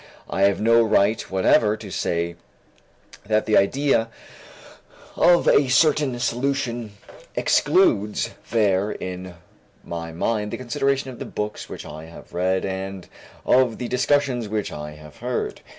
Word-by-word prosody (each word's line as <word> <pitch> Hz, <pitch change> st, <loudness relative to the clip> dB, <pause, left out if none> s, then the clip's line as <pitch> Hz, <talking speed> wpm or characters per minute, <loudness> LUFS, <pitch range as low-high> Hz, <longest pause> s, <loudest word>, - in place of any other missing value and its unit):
I 95 Hz, -, -3 dB
have 100 Hz, 0 st, +2 dB
no 115 Hz, +2 st, +5 dB
right 110 Hz, -1 st, +3 dB
whatever 105 Hz, +3 st, +3 dB
to 100 Hz, -3 st, -10 dB
say 85 Hz, 0 st, -2 dB, 0.9 s
that 110 Hz, +1 st, +1 dB
the 110 Hz, -, +2 dB
idea 120 Hz, +2 st, +2 dB, 1.1 s
of 175 Hz, 0 st, +4 dB
a 140 Hz, -, +5 dB
certain 145 Hz, -1 st, +3 dB
solution 120 Hz, -3 st, -2 dB, 0.4 s
excludes 130 Hz, -, +2 dB, 0.2 s
there 105 Hz, -3 st, +2 dB
in 90 Hz, -1 st, -7 dB, 0.5 s
my 85 Hz, -1 st, -6 dB
mind 105 Hz, +5 st, -1 dB
the -, -, -4 dB
consideration 135 Hz, +2 st, -1 dB
of 125 Hz, -, -12 dB
the -, -, -5 dB
books 105 Hz, 0 st, -5 dB
which -, -, -8 dB
I 75 Hz, +1 st, -9 dB
have 80 Hz, -, -14 dB
read 95 Hz, +2 st, 0 dB
and 95 Hz, -1 st, -5 dB, 0.4 s
of 125 Hz, -3 st, +3 dB
the 125 Hz, -, -4 dB
discussions 125 Hz, -3 st, +1 dB
which 105 Hz, 0 st, -2 dB
I 75 Hz, 0 st, -7 dB
have 75 Hz, -2 st, -14 dB
heard. -, -, -3 dB
110 Hz, 135 wpm, -23 LUFS, 95-125 Hz, 1.1 s, no